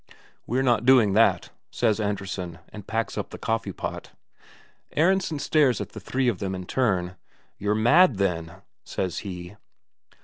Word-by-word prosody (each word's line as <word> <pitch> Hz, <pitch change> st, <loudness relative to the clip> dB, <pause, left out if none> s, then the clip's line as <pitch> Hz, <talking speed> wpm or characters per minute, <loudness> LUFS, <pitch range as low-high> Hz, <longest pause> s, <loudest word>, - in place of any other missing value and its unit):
"We're 130 Hz, +3 st, 0 dB
not 120 Hz, -4 st, +2 dB
doing 120 Hz, -6 st, +5 dB
that," 100 Hz, -5 st, +3 dB, 0.2 s
says 110 Hz, 0 st, +1 dB
Andresen, 100 Hz, -4 st, -3 dB
and 105 Hz, -2 st, -11 dB
packs 115 Hz, +1 st, -2 dB
up -, -, -4 dB
the -, -, -9 dB
coffee 115 Hz, -3 st, -2 dB
pot. -, -, -6 dB, 0.8 s
Aronsen 175 Hz, 0 st, +2 dB
stares 145 Hz, -3 st, +2 dB
at 100 Hz, -1 st, -5 dB
the 110 Hz, -, -9 dB
three 130 Hz, +6 st, -1 dB
of 110 Hz, -7 st, 0 dB
them 95 Hz, -1 st, -3 dB
in 90 Hz, -1 st, -6 dB
turn. 90 Hz, -7 st, 0 dB, 0.4 s
"You're 105 Hz, +1 st, 0 dB
mad, 120 Hz, -, +5 dB
then," 90 Hz, -1 st, -2 dB, 0.2 s
says 90 Hz, -3 st, -3 dB
he. 90 Hz, -1 st, -8 dB
105 Hz, 150 wpm, -25 LUFS, 95-125 Hz, 0.8 s, doing